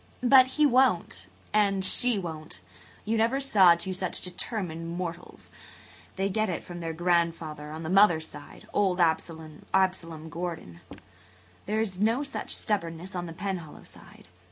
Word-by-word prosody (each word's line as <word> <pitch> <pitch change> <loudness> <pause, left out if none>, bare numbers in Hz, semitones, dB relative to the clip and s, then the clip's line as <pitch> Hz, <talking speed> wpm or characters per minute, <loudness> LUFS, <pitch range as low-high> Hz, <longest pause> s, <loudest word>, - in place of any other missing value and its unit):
"But 255 +1 +7
he 305 - +5
won't. 240 - +2 0.3
And 200 -2 +2
she 240 +4 +3
won't. 160 -4 -6 0.4
You 225 +2 0
never 230 +5 +2
saw 195 -11 +6
two 185 +2 -4
such 185 -1 -3
determined 175 -3 -4
mortals. 175 -1 -7 0.6
They 195 +1 0
get 215 +2 0
it 170 - -3
from 175 -1 -8
their 165 -1 -4
grandfather 165 -3 -1
on 155 +2 -7
the 160 - -4
mother's 175 -5 +5
side–old 180 +5 -3
Absalom 165 0 -1
Gordon. 165 - -6 0.9
There 215 +2 0
is 190 -4 -2
no 230 +6 +2
such 280 - -3
stubbornness 175 -3 -3
on 175 -1 -4
the 165 - -7
Penhallow 175 -4 -5
side. - - -15
180 Hz, 140 wpm, -27 LUFS, 165-205 Hz, 0.9 s, But